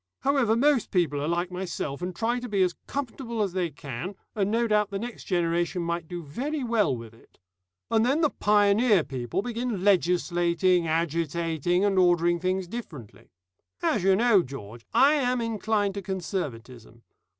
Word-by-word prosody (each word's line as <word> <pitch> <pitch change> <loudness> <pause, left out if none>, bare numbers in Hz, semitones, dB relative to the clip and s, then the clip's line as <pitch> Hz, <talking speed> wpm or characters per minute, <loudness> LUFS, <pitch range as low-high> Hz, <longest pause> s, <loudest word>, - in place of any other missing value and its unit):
However, 270 -5 +2
most 270 -1 +2
people 155 -6 +1
are 145 - -2
like 175 +2 -1
myself, 175 -5 -4
and 180 0 -4
try 235 +6 0
to 245 0 -7
be 200 -2 +2
as 180 -1 +1
comfortable 240 -4 -3
as 195 -3 -3
they 180 -2 0
can, 140 +5 -7 0.2
and 200 -2 0
no 230 +2 +1
doubt 210 -2 +2
the 200 - -3
next 235 +3 -7
generation 175 0 0
might 170 -1 -3
do 175 0 -6
very 270 - -4
well 210 - +1
with 115 -1 -10
it. 115 - -23 0.5
And 220 0 +3
then 275 +7 +2
the 305 - +3
pioneer 205 -1 +3
people 130 - -3
begin 235 -4 -3
legislating, 175 -2 +2
agitating, 165 +2 0
and 195 -2 +2
ordering 175 -1 +3
things 185 +1 -1
differently. 165 - -9 0.5
As 210 - +2
you 190 0 +5
know, 220 -2 +4
George, 115 -6 -9
I 280 +3 +5
am 250 -4 +1
inclined 215 -3 0
to 200 - -5
conservatism. 130 - -5
185 Hz, 165 wpm, -26 LUFS, 170-225 Hz, 0.5 s, you